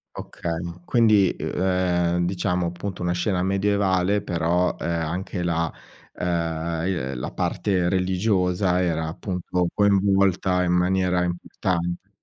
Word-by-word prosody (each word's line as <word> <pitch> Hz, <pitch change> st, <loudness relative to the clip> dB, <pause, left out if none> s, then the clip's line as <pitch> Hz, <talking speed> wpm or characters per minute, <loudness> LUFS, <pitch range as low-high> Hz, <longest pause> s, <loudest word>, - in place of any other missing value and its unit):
Okay, 85 Hz, -1 st, -4 dB
ma 85 Hz, 0 st, -7 dB
quindi, 105 Hz, -3 st, +4 dB
uhm, -, -, -3 dB
ehm, 90 Hz, -2 st, +1 dB
diciamo 90 Hz, 0 st, 0 dB
appunto, 90 Hz, +2 st, -5 dB
una 90 Hz, -, 0 dB
scena 90 Hz, +1 st, 0 dB
medievale 100 Hz, 0 st, +1 dB
però, 85 Hz, +1 st, +1 dB
ehm, -, -, -3 dB
anche 85 Hz, +3 st, -2 dB
la 85 Hz, -1 st, 0 dB, 0.4 s
uhm, 85 Hz, -1 st, -2 dB
i -, -, +1 dB
ehm, 65 Hz, -5 st, -4 dB
la -, -, -4 dB
parte 95 Hz, -4 st, 0 dB
religiosa 90 Hz, 0 st, +1 dB
era 80 Hz, -3 st, 0 dB
appunto 90 Hz, +1 st, -2 dB
coinvolta 95 Hz, -2 st, +3 dB
in 90 Hz, -, +1 dB
maniera 90 Hz, 0 st, +2 dB
importante. 85 Hz, 0 st, -3 dB
90 Hz, 130 wpm, -24 LUFS, 85-95 Hz, 0.4 s, quindi